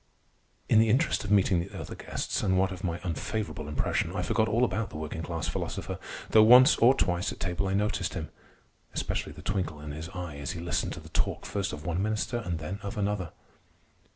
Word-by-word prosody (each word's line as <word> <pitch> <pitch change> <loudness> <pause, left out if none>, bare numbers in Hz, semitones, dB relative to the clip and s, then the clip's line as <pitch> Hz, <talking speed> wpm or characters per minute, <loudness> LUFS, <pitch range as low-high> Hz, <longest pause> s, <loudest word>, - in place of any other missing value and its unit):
In 110 - +5
the 110 0 +4
interest 135 +10 +2
of 100 - -5
meeting 100 -3 +4
the 90 +3 -5
other - - -6
guests, - - -3
and 95 -1 +2
what 95 0 +2
of 90 -1 -7
my 85 -2 -1
unfavorable 90 -1 -3
impression, 75 -2 -1
I - - -1
forgot 110 - +2
all 115 +4 +3
about 115 -3 -2
the - - -8
working 80 +1 -4
class 80 -1 -3
philosopher, - - -4 0.3
though 110 - +8
once 125 +6 +8
or 125 +4 +6
twice 90 -4 +1
at - - -9
table 90 +1 -1
I 95 - 0
noticed 100 -3 0
him—especially - - -6
the - - -12
twinkle 90 -6 -2
in 75 0 -7
his 80 +3 -6
eye 90 -5 -6
as 70 - -4
he 85 - -6
listened 85 +1 -1
to - - -7
the - - -13
talk - - -1
first 100 0 -2
of 75 +1 -7
one 85 +1 0
minister 110 +3 -1
and 90 -7 -3
then 80 +6 -5
of 100 0 -5
another. 100 -4 -1
95 Hz, 210 wpm, -29 LUFS, 85-105 Hz, 0.3 s, though